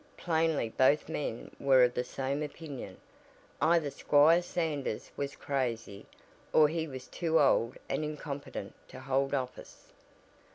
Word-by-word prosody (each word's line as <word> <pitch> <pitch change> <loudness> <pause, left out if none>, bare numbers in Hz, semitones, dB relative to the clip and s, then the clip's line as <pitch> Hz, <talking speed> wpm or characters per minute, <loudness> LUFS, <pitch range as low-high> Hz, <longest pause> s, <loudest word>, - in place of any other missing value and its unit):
Plainly 160 -7 +1
both 140 +6 +3
men 145 -7 -4
were 135 -2 +5
of 125 0 +3
the 125 - -1
same 135 +3 -3
opinion 145 - -7 0.6
either 160 -2 +3
Squire 155 +6 +5
Sanders 155 -9 -3
was 140 0 -4
crazy 115 -7 -3 0.4
or 155 - +6
he 160 0 -2
was 130 -3 -8
too 165 -2 +1
old 125 -4 +3
and - - -1
incompetent 150 -2 -6
to - - -11
hold 135 +1 0
office. 130 -2 -6
140 Hz, 130 wpm, -31 LUFS, 130-160 Hz, 0.6 s, or